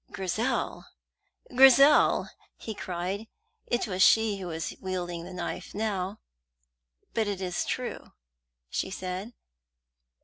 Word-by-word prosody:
"Grizel, 215 +7 -2 0.7
Grizel!" 270 +3 +7 0.3
he 220 - -6
cried. 190 +2 -4 0.4
It 240 - 0
was 190 -4 -2
she 220 0 +5
who 185 - -5
was 160 -1 -4
wielding 175 -2 -4
the 185 - -9
knife 180 +1 -5
now. 205 -1 -2 0.9
"But 220 -2 +1
it 200 -2 -2
is 180 -2 -2
true," - - -4 0.6
she 125 - -2
said. 185 +4 -5
190 Hz, 110 wpm, -28 LUFS, 180-220 Hz, 0.9 s, Grizel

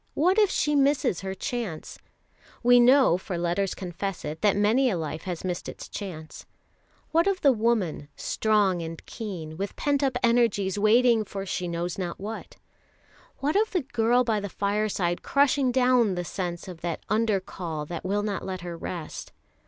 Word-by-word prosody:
What 365 +7 +3
if 415 -3 +5
she 295 -5 +1
misses 275 - +2
her 190 0 -4
chance? 210 -6 -5 0.6
We 245 +1 +7
know, 250 -7 +5
for 185 -2 -5
letters 175 +3 -1
confess 185 +1 -5
it, 150 +1 -5
that 205 -2 +3
many 225 +6 +3
a 190 - -1
life 155 -1 -4
has 180 -3 -4
missed 180 -2 -3
its - - -9
chance. 160 -6 -8 0.6
What 335 +3 +3
of 390 -2 0
the 280 - +6
woman, 215 - 0
strong 205 -5 +1
and 165 0 -7
keen, 170 -8 -6
with 200 +2 -4
pent 285 -1 0
up 265 -3 +1
energies 225 -5 +2
waiting 230 +2 +4
for 195 -1 -6
she 180 -1 -3
knows 170 +1 -3
not 175 -2 -4
what? 215 +3 -7 0.9
What 290 +5 0
of 435 +1 +2
the 360 - +2
girl 245 -1 +2
by 225 -3 0
the 205 0 -5
fireside 200 -3 -1
crushing 280 -2 +2
down 250 -5 +3
the 175 0 -3
sense 175 +1 -4
of 175 -3 -10
an 170 -2 -2
Under 215 -2 +2
call 165 -5 -5
that 170 +2 -6
will 200 +3 0
not 205 -2 -2
let 185 -2 -5
her 175 -1 -6
rest? 165 -1 -6
205 Hz, 175 wpm, -26 LUFS, 175-245 Hz, 0.9 s, We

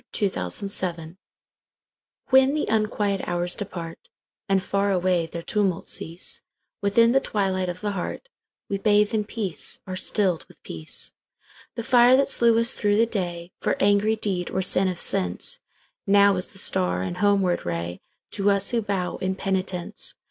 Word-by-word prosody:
The - - -3
Hour 90 - -2
of 195 - -5
Twilight 170 -2 -4 1.2
WHEN 265 +2 +5
the 305 - 0
unquiet 210 -2 0
hours 175 0 -1
departAnd 185 +1 -5
far 200 +1 0
away 180 -2 +1
their 170 0 -7
tumults 195 -4 -1
cease, 165 +3 -3 0.4
Within 230 +3 +4
the 270 - +4
twilight 190 -6 -1
of 180 +1 -6
the 210 -1 -1
heartWe 200 - -7
bathe 210 0 +3
in 215 -1 0
peace, 205 -5 -4
are 185 - -5
stilled 185 -2 0
with - - -21
peace. 80 -1 -5 0.6
The 230 - -4
fire 245 +2 +6
that 275 - +2
slew 235 -3 +3
us 230 +1 +4
through 205 -1 +1
the 230 - +5
dayFor 175 -5 -3
angry 205 +2 +3
deed 190 -5 -3
or 190 - -1
sin 190 +1 +4
of 180 -2 -2
senseNow 195 - +1
is 180 - 0
the - - -13
star 90 - +1
and 90 -1 -4
homeward 195 -3 +2
rayTo 85 - -4
us 200 -1 +3
who 235 -1 +1
bow 195 -4 -2
in 190 0 -2
penitence. 190 -2 -3
195 Hz, 155 wpm, -24 LUFS, 175-210 Hz, 1.2 s, fire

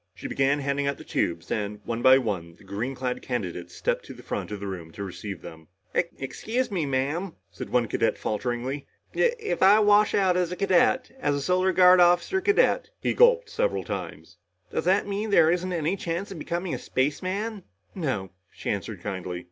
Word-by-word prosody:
She - - -7
began 135 +1 +2
handing 140 0 -1
out 140 - -1
the - - -11
tubes 85 - -2
and, 105 -1 -2
one 115 0 -3
by 130 +1 +7
one, 95 -9 -3
the - - -20
green 120 +7 -4
clad 125 -1 -3
candidates 90 -8 -4
stepped - - -1
to - - -10
the - - -13
front - - -4
of 105 -1 -5
the 100 - -6
room 90 -4 -6
to 100 - -6
receive 100 0 -7
them. 80 -1 -11 0.3
"Excuse 220 - -2
me, 170 -7 -1
Ma'am," 145 +7 -1 0.2
said - - -7
one 120 -2 +2
cadet - - 0
falteringly. 120 +5 -3 0.3
"If 485 0 +2
if 440 -1 -3
I 200 +3 +7
wash 210 0 +4
out 190 -3 +3
as 180 -1 0
a - - -2
cadet 195 +7 +2
as 145 - +1
a 140 - -2
Solar 185 +3 +2
Guard 185 0 +7
officer 175 - +4
cadet" 415 +6 +2
he - - 0
gulped 485 0 +4
several - - 0
times - - -6 0.4
"does - - -1
that 190 +3 +3
mean 205 +2 -3
there 165 -5 +5
isn't 180 +1 -1
any 170 +1 0
chance 180 +1 -4
of 180 - -7
becoming 170 +3 -3
a - - -3
spaceman?" 190 - -2 0.3
"No," 130 - -3 0.2
she - - -4
answered 100 -2 -5
kindly. 90 -3 -4
150 Hz, 195 wpm, -26 LUFS, -, 0.4 s, by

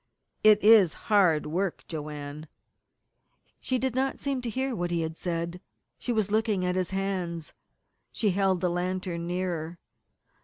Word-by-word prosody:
"It 215 -1 +6
is 210 -6 +7 0.2
hard 175 -7 +4
work, 175 +4 -2
Joanne." 150 -1 -6 1.1
She 255 - -1
did 260 -1 -1
not 265 +1 0
seem 275 -2 -2
to 245 - -3
hear 260 +2 -2
what 175 -3 -2
he 170 -1 0
had 160 0 -3
said. 170 +1 -3 0.4
She 245 - -2
was 215 -3 0
looking 215 -4 +1
at 180 0 0
his 185 -2 0
hands. 185 -4 -3 0.6
She 210 -3 +1
held 190 -1 +1
the 180 - +2
lantern 180 -1 -2
nearer. 175 -2 -3
185 Hz, 150 wpm, -28 LUFS, 170-215 Hz, 1.1 s, is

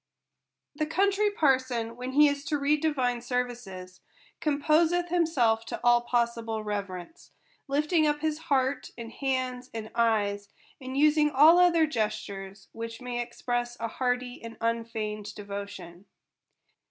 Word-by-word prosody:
The 305 +1 -2
Country 400 +5 +2
Parson, 260 - +1
when 250 +2 -6
he 295 +2 +7
is 285 -1 -1
to 300 - 0
read 290 +1 +1
divine 255 -6 0
ser 250 +1 0
vices, 185 -7 -10 0.4
composeth 320 +4 +2
himself 275 -11 +2
to - - -5
all 240 0 +5
possible 235 -2 -1
reverence; 200 - -6 0.3
lifting 300 +3 +2
up 295 0 0
his 310 -1 -1
heart, 265 -1 +1
and 230 -1 -7
hands, 255 -2 -2
and 220 -1 -6
eyes, 205 -3 +1 0.3
and 260 +1 -5
using 300 +1 +4
all 305 +5 +7
other 340 -3 +5
gestures 200 -6 -4
which 230 0 -7
may 245 -1 -3
express 240 0 -3
a 230 - -2
hearty 250 +1 -2
and 230 0 -8
un 230 0 0
feigned 210 -2 -5
devotion. 200 -3 -8
245 Hz, 140 wpm, -28 LUFS, 225-295 Hz, 0.4 s, he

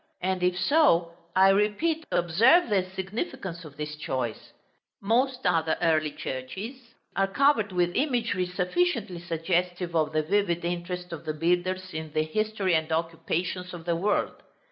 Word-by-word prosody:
And 185 0 -1
if 180 0 +1
so, 185 - +3 0.2
I 190 +1 +6
repeat, 215 +12 +1
observe 225 - +4
the 195 -3 +3
significance 195 - -4
of 145 -3 -12
this 150 0 -4
choice. 130 -6 -4 0.5
Most 250 +5 +1
other 160 -1 +2
early 155 -2 +2
churches 210 - -7 0.2
are 195 0 +2
covered 220 -1 +2
with 175 -1 +1
imagery 235 -10 0
sufficiently 195 - 0
suggestive 175 +1 -1
of 155 -1 +2
the 155 0 +1
vivid 175 -1 0
interest 175 0 -4
of 165 - -8
the 155 - -2
builders 180 +3 0
in 155 -1 -6
the 155 - +2
history 205 +2 -1
and 160 0 +1
occupations 170 +2 -2
of 165 -1 -10
the 170 -1 +1
world. 200 +5 0
180 Hz, 145 wpm, -27 LUFS, 165-210 Hz, 0.5 s, I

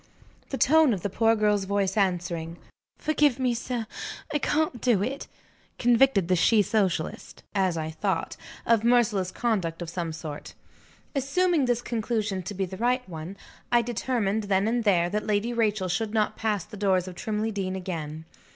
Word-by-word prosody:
The 270 - -3
tone 310 -1 +5
of 180 - -8
the 205 - -2
poor 225 +2 +3
girl's 210 -2 +2
voice 195 -1 0
answering, 175 -4 -1 0.4
"Forgive 295 -4 +2
me, 255 -2 +1
sir; 240 0 -3 0.5
I 295 - +2
can't 300 -5 0
do 230 -6 +3
it" 270 +5 -4 0.5
convicted 240 -5 +4
the 185 - +3
she 210 +4 +4
socialist 190 -5 -1
(as 190 -4 +1
I 160 0 -3
thought) 185 +1 -2 0.3
of 230 -2 +3
merciless 230 -6 +3
conduct 185 -8 -1
of 170 -2 -5
some 170 -2 -3
sort. 155 -2 -7 0.6
Assuming 295 +3 +2
this 240 -1 0
conclusion 220 -4 -1
to 200 +3 -6
be 190 0 -1
the 190 +1 -8
right 250 +3 0
one, 170 +2 -7 0.3
I 240 -1 +4
determined, 220 -3 -1
then 195 +1 +2
and 235 +1 +1
there, 175 -4 +4
that 210 +5 -3
Lady 215 +3 0
Rachel 215 -4 +1
should 210 +5 -2
not 215 -1 +1
pass 210 -5 -1
the 210 - -11
doors 190 -2 +1
of 185 - -6
Trimley 215 +4 -2
Deen 190 -2 -3
again. 160 -4 -5
210 Hz, 170 wpm, -26 LUFS, 185-240 Hz, 0.6 s, tone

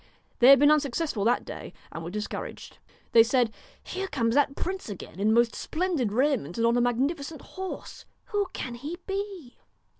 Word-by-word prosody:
They 245 - +6
had 275 +1 +10
been 290 +2 +6
unsuccessful 290 -5 +1
that 240 +2 +2
day - - -8 0.2
and 165 - -6
were 165 - -5
discouraged. 210 +3 -6 0.3
They 230 - +8
said: 235 -1 +2 0.2
' - - -29
Here 385 +1 -2
comes 230 -9 0
that 280 0 +3
prince 375 -7 -4
again 190 -2 -8
in 210 +2 +3
most 235 +1 +4
splendid 315 - -1
raiment 245 - +1
and 230 - +2
on 235 +1 +3
a 245 - +3
magnifi 265 +6 +1
cent 310 +2 -8
horse. 380 -1 -7 0.3
Who 410 -2 +1
can 250 - -5
he 290 +8 -6
be 390 -9 -5
265 Hz, 185 wpm, -27 LUFS, 230-330 Hz, 0.3 s, had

